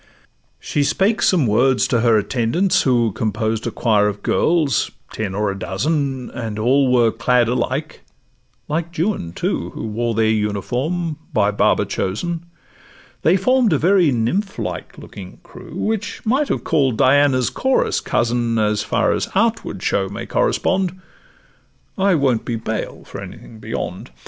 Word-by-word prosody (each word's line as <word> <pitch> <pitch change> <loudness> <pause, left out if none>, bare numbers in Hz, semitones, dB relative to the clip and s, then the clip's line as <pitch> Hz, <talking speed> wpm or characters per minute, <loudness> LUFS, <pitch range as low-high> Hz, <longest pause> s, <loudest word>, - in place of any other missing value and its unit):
She 145 - -1
spake 195 +10 +1
some 170 -8 +3
words 125 +4 +3
to 120 - +2
her 115 -1 +4
attendants, 120 - +1
who 120 -4 +2
Composed 110 +2 -2
a - - +1
choir 105 -3 +2
of 100 -1 -4
girls, 160 -5 +1 0.2
ten 100 -4 -3
or 105 0 0
a 100 - -7
dozen, 135 - -2
And 110 -3 -5
were 110 - -2
all 125 -3 +4
clad 120 +1 +2
alike; 130 +5 -2 0.7
like 165 +3 -3
Juan, 165 - -1
too, - - -2
Who - - -5
wore 115 +1 -2
their 110 0 +2
uniform, 125 - -1 0.2
by 105 -1 +2
Baba 105 - +2
chosen; 170 - -3 0.7
They 175 +4 +4
form'd 245 +1 +3
a - - +3
very 180 +1 +4
nymph 165 - -1
like - - -5
looking - - -11
crew, - - -12
Which 215 0 -3
might 265 +6 +2
have - - -1
call'd 135 -7 +1
Diana's 130 -1 +3
chorus 265 0 +1
'cousin,' 120 0 0
As 105 -1 +1
far 105 - +1
as - - -1
outward - - 0
show 95 -1 0
may 100 - -6
correspond; 185 -1 0 1.0
I 195 -1 +2
won't 130 -6 +1
be 120 - -3
bail 110 -1 -4
for - - -8
anything 110 - -11
beyond. - - -5
125 Hz, 150 wpm, -20 LUFS, 110-165 Hz, 1.0 s, her